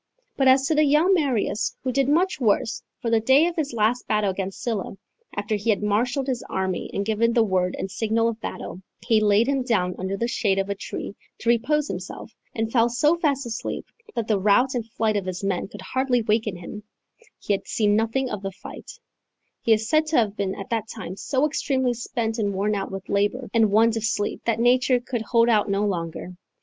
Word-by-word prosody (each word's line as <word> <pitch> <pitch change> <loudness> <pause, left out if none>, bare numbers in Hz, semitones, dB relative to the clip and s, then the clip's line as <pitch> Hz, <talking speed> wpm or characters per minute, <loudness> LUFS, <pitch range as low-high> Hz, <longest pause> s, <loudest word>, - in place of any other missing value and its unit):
But 270 - +2
as 265 +1 +5
to 315 - +1
the 305 0 +4
young 305 +6 +4
Marius, 240 - 0
who 260 - 0
did 275 +1 +1
much 355 +4 +2
worse 225 +1 +1 0.2
(for 230 - -2
the 225 - +4
day 265 +7 +5
of 345 0 -2
his 300 -3 -1
last 230 +2 0
battle 210 -2 +1
against 190 0 -5
Sylla, 220 -5 -3 0.4
after 205 +1 -2
he 210 +2 -1
had 210 -1 +2
marshalled 245 +6 +1
his 255 -3 -2
army 190 -1 -2
and 200 - -2
given 225 +2 +1
the 230 -2 +4
word 185 -3 0
and 190 - -4
signal 225 +1 +1
of 230 -1 -3
battle, 185 - -6 0.2
he 220 -2 +3
laid 210 +1 +4
him 275 0 0
down 205 -8 0
under 190 +2 -2
the 235 - -1
shade 205 -5 0
of 195 +1 -1
a - - +2
tree 200 - -6 0.2
to 230 - -2
repose 285 +6 +2
himself, 185 +4 -7 0.2
and 225 0 -2
fell 235 -1 +3
so 295 +7 +3
fast 285 -5 0
asleep 230 -1 -4 0.3
that 230 -2 -2
the 210 -3 +2
rout 215 +7 +3
and 230 -3 -3
flight 220 -1 0
of 195 -2 -3
his 185 +1 -4
men 195 -2 -1
could 205 0 -11
hardly 255 +2 0
waken 215 -2 0
him, 180 +4 -8 0.6
he 205 - -1
having 195 - -2
seen 210 -2 +2
nothing 225 +5 0
of 210 -5 -4
the 195 -1 -4
fight), 190 - -10 0.7
he 230 - +1
is 220 0 +3
said 310 +2 +2
to 310 - +1
have 215 -3 +2
been 195 -2 -2
at 195 - -8
that 225 -1 -1
time 220 -6 -7
so 265 +7 0
extremely 265 -4 0
spent 235 -1 -3
and 200 -2 0
worn 205 +2 0
out 195 -1 -2
with 195 0 -7
labour 205 +6 0
and 225 -2 +4
want 225 +2 +4
of 225 - -2
sleep, 205 -1 -1
that 230 - +1
nature 250 +1 +3
could 240 -1 -4
hold 230 +1 +3
out 215 -3 +3
no 200 +1 +1
longer. 175 -2 -3
225 Hz, 220 wpm, -24 LUFS, 205-250 Hz, 0.7 s, as